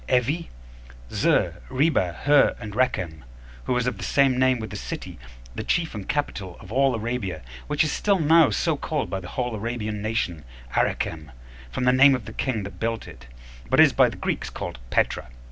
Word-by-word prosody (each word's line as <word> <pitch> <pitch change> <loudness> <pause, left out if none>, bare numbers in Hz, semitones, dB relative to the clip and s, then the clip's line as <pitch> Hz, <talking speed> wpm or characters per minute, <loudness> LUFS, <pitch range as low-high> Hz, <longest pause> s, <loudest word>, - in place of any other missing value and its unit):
Evi, 135 +7 +1 0.6
Zur, 85 0 +1
Reba, 130 - +2
Hur, 145 -1 +5
and 105 -1 -7
Rekem, 95 - 0 0.4
who - - 0
was 125 -1 +1
of 125 -6 -2
the - - -5
same 135 +5 +3
name 130 -1 +4
with 110 -3 -6
a - - -5
city, - - -6 0.3
the 110 - -4
chief 165 +6 0
and 105 -3 -7
capital 100 - -2
of 100 - -12
all 135 +1 +3
Arabia, 115 - -3 0.2
which 150 +1 +2
is 155 - -1
still 200 -1 +2
now 160 -2 +5
so 105 - +1
called - - -3
by 95 - -1
the 90 - -9
whole 125 -2 -2
Arabian 110 -1 -3
nation, 100 -7 -2 0.3
Arecem, 80 -2 -1 0.4
from 65 - -2
the 125 0 +4
name 135 +1 +7
of 120 -5 -6
the - - -8
king 115 -6 -2
that 100 - -9
built 115 0 -2
it; 65 -1 -13 0.4
but - - +3
is - - +7
by - - +5
the - - -9
Greeks - - -2
calledPetra. - - -2
115 Hz, 190 wpm, -24 LUFS, 100-135 Hz, 0.6 s, name